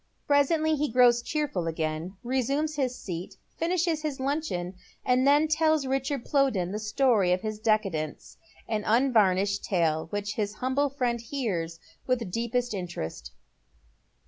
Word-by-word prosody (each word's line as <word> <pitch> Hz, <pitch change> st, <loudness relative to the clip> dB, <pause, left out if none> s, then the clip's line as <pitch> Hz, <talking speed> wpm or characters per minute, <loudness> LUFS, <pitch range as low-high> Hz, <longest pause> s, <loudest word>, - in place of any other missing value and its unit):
S8 -, -, -45 dB
Presently 310 Hz, +2 st, +3 dB
be 300 Hz, +1 st, 0 dB
grows 240 Hz, 0 st, +5 dB
cheerful 275 Hz, -, -2 dB
again, 160 Hz, +3 st, -3 dB
resumes 275 Hz, +5 st, 0 dB
his 255 Hz, -3 st, -1 dB
seat, 175 Hz, -2 st, -6 dB, 0.2 s
finishes 335 Hz, -1 st, +1 dB
tis 300 Hz, -4 st, -3 dB
luncheon, 265 Hz, -, -2 dB, 0.3 s
and 255 Hz, +1 st, +3 dB
then 295 Hz, +2 st, +5 dB
tells 315 Hz, -2 st, +2 dB
Richard 270 Hz, 0 st, -1 dB
Plowden 255 Hz, -11 st, +1 dB
the 210 Hz, -, -3 dB
story 215 Hz, -3 st, +2 dB
of 180 Hz, 0 st, +1 dB
his 215 Hz, -1 st, -4 dB
Jecadence, 195 Hz, -9 st, -1 dB, 0.3 s
an 215 Hz, -2 st, -1 dB
unvarnished 205 Hz, -5 st, +3 dB
tale 160 Hz, -4 st, 0 dB
which 205 Hz, +3 st, -3 dB
his 210 Hz, -1 st, -2 dB
humble 260 Hz, +4 st, 0 dB
friend 250 Hz, -4 st, -1 dB
hears 195 Hz, -, -3 dB, 0.3 s
with 240 Hz, -7 st, 0 dB
deepest 235 Hz, +2 st, -1 dB
interest. 80 Hz, -, -5 dB
235 Hz, 140 wpm, -27 LUFS, 190-280 Hz, 0.3 s, grows